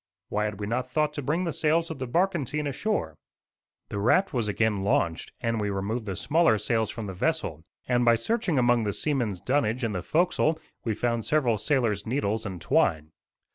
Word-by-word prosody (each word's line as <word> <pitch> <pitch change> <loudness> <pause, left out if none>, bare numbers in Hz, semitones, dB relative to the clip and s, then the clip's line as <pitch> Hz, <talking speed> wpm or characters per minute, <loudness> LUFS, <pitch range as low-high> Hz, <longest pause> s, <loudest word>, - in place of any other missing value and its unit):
Why 105 0 0
had 105 -1 -4
we 105 - -3
not 125 +4 -2
thought 150 +2 +1
to 145 - -4
bring 155 +7 0
the 165 -3 -2
sails 165 +2 +1
of 160 - -6
the 130 - -3
barkentine 150 -1 0
ashore? 145 - -1 0.8
The 100 - -3
raft 185 - +3
was 120 -4 0
again 105 -1 +1
launched, 85 -4 0
and 115 -2 0
we 105 - -1
removed 105 +4 -3
the 95 - -2
smaller 160 - +3
sails 110 +1 0
from 115 -3 -5
the 95 - -5
vessel; 95 - -1 0.2
and, 125 -1 +2
by 120 -1 +5
searching 180 - 0
among 120 -2 +3
the 105 -1 -1
seamen's 120 - -1
dunnage 130 -1 0
in 115 - 0
the 90 -3 -3
forecastle, 165 - +1 0.3
we 110 -2 -1
found 115 0 0
several 125 -8 +2
sailors' 115 -6 0
needles 110 -3 -1
and 95 -3 -6
twine. 80 -1 +1
120 Hz, 195 wpm, -27 LUFS, 105-150 Hz, 0.8 s, by